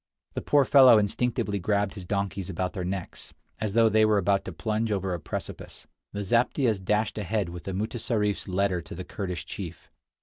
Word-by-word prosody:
The - - -3
poor 145 -2 +3
fellow 130 -5 +8
instinctively 105 -1 0
grabbed 100 +1 0
his 95 -4 -9
donkeys 100 -2 -2
about 95 -1 -2
their 95 -4 -4
necks, 95 0 -6 0.2
as 105 -2 -2
though 115 0 +5
they 110 0 +4
were 110 -1 +4
about 100 0 +1
to - - -5
plunge 110 +7 -2
over 95 -2 -1
a 85 - -3
precipice. - - -7 0.3
The 100 0 -4
zaptiehs 115 -1 +1
dashed 105 +3 0
ahead 100 -1 -1
with 85 0 -9
the 95 - -3
mutessarif's 110 0 -1
letter 95 -1 0
to 85 - -9
the 90 +1 -6
Kurdish 90 -6 -5
chief. 85 -5 -8
100 Hz, 190 wpm, -27 LUFS, 95-110 Hz, 0.3 s, fellow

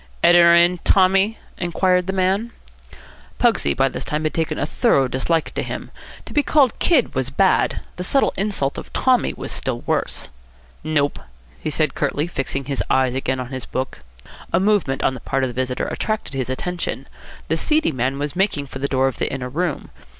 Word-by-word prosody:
"Editor 170 0 +7
in, 175 +1 +4
Tommy?" 195 +4 +3 0.2
inquired 180 +1 +1
the - - 0
man. 195 +4 +1 0.9
Pugsy 70 - +2
by 135 - +3
this - - -4
time 150 +1 -2
had 155 - -1
taken 160 -1 -1
a - - 0
thorough 145 - +2
dislike 155 +6 -1
to - - -2
him. - - -6 0.3
To - - -9
be 295 - +4
called 280 -5 +2
"kid" 295 -9 +3
was 130 -1 -1
bad. 190 +8 +2 0.2
The 180 - -3
subtle 270 +9 +2
insult 195 -9 -1
of - - -11
"Tommy" 255 -2 +2
was - - -6
still - - -2
worse. - - -2 0.5
"Nope," 145 -2 0 0.4
he - - -3
said 155 -2 +1
curtly, 145 +1 -1
fixing 135 -4 -3
his 135 0 -2
eyes 130 -1 +2
again 130 0 -1
on 125 -1 -5
his 130 -1 -5
book. 130 0 -4 0.5
A 170 - +3
movement 190 -9 +1
on - - +2
the 130 - -7
part 135 +2 -1
of 130 - 0
the - - -7
visitor 130 -1 -2
attracted 215 -8 -3
his 130 -2 -2
attention. 175 +7 -3 0.4
The - - +1
seedy 310 - +1
man 130 0 -1
was 145 0 -3
making 185 -6 0
for 135 -1 -9
the 140 - 0
door 135 -1 +2
of 135 - -4
the - - -1
inner 125 -2 -4
room. 165 +3 -3
155 Hz, 195 wpm, -21 LUFS, 135-190 Hz, 0.9 s, Editor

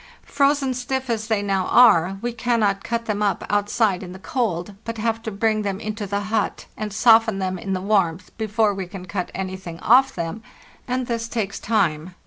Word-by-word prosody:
Frozen 280 -1 +1
stiff 255 0 -3
as 220 -1 -2
they 220 -3 0
now 195 -2 0
are, 195 -6 +5
we 240 0 -2
cannot 225 -4 +1
cut 235 0 -2
them 210 -2 -2
up 205 -2 0
outside 205 -1 +1
in 180 -2 -8
the - - -9
cold, 200 -4 -2
but 230 0 -5
have 225 +1 -1
to 225 - -4
bring 215 +1 0
them 200 -2 -3
into 215 -1 -4
the 200 +1 -1
hut 210 0 -2
and 215 - -4
_ - - -9
soften 225 -2 +5
them 185 -1 -2
in 195 +2 -3
the 185 - -2
warmth 185 -4 0
before 215 -1 +1
we 190 -2 -5
can 180 0 -9
cut 185 0 -3
anything 185 -3 -5
off 265 +4 +5
them, 170 +5 -4 0.5
and 255 0 -1
this 230 -1 -2
takes 215 -4 -3
time. 180 -5 0
210 Hz, 200 wpm, -22 LUFS, 190-230 Hz, 0.5 s, are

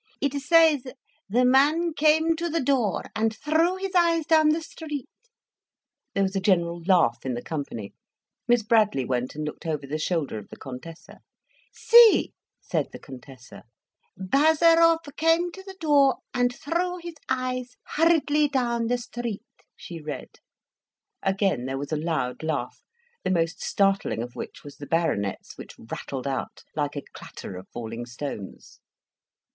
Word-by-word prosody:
"It 280 -1 0
says 320 -2 +5 0.5
the 245 +5 +3
man 300 +6 +4
came 315 +2 +3
to 340 +1 -2
the 330 +1 0
door 250 - 0
and 220 0 0
threw 325 +4 +2
his 385 0 -4
eyes 335 -3 +3
down 315 -1 +5
the 320 +1 +1
street." 300 -4 -6 1.1
There 200 - +2
was 190 0 -1
a - - +2
general 170 -3 +1
laugh 180 -1 +3
in 130 -2 -2
the 120 - -6
company. 140 -9 -5 0.5
Miss 240 -2 +3
Bradley 210 - +2
went 125 +1 -2
and 155 0 -4
looked 150 - -7
over 150 -3 -2
the 150 +3 -4
shoulder 155 -9 -1
of 105 - -13
the - - -10
Contessa. 140 +5 -10 0.5
"See!" 470 -2 +6 0.3
said - - -2
the - - -8
Contessa. 130 -1 -12 0.6
"Bazarov 325 - +4 0.2
came 330 +2 +2
to 380 - -10
the 385 0 -11
door 285 -4 +4 0.2
and 245 0 +2
threw 345 +7 -2
his 340 -2 -9
eyes 255 -1 -2
hurriedly 300 -2 +3
down 240 -4 0
the 245 +1 +1
street," 240 -2 -5 0.3
she 170 -2 -9
read. 150 -1 -6 0.9
Again 195 - 0
there 135 +1 -3
was 140 +2 -6
a - - +1
loud 155 -5 -2
laugh, 155 -6 -3 0.4
the - - -1
most 165 -1 0
startling 195 - +1
of 120 0 -9
which - - -8
was 145 -1 -11
the 145 - -9
Baronet's, 105 - -1
which - - -10
rattled 130 +3 -6
out 135 -2 -4
like 145 -1 -2
a 145 - -4
clatter 95 - -9
of 90 +1 -9
falling 120 0 -6
stones. 120 -5 -8
225 Hz, 155 wpm, -25 LUFS, -, 1.1 s, See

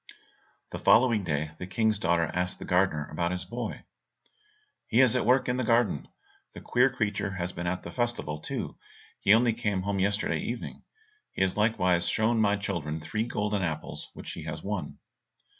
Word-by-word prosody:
The - - -5
following 115 -2 +5
day 75 -2 -1
the 90 - -5
King's 110 +2 +1
daughter 85 -1 +2
asked 90 +1 0
the - - -8
gardener 90 -5 +1
about 85 +2 -1
his 90 -1 -3
boy. 120 +6 -5 1.0
"He 115 - +2
is 130 -2 +5
at 125 - +1
work 130 +1 +4
in 125 0 0
the 130 - 0
garden; 115 - +2 0.5
the - - -8
queer 125 +2 +3
creature 105 -5 -1
has 90 -1 -3
been 85 0 -4
at 90 +1 -2
the - - -7
festival 120 -11 -2
too, - - -4 0.4
and 100 - +7
only 115 0 +3
came 105 -5 -1
home 100 0 -1
yesterday 100 +2 +1
evening; - - -5 0.5
he - - +1
has 95 - 0
likewise 90 -5 +2
shown 110 +1 +2
my 105 -1 +3
children 85 -7 -3
three 110 +8 -2
golden 105 -3 -1
apples 80 -4 -4
which - - -7
he - - -7
has - - -5
won." - - -4
100 Hz, 180 wpm, -28 LUFS, 90-115 Hz, 1.0 s, and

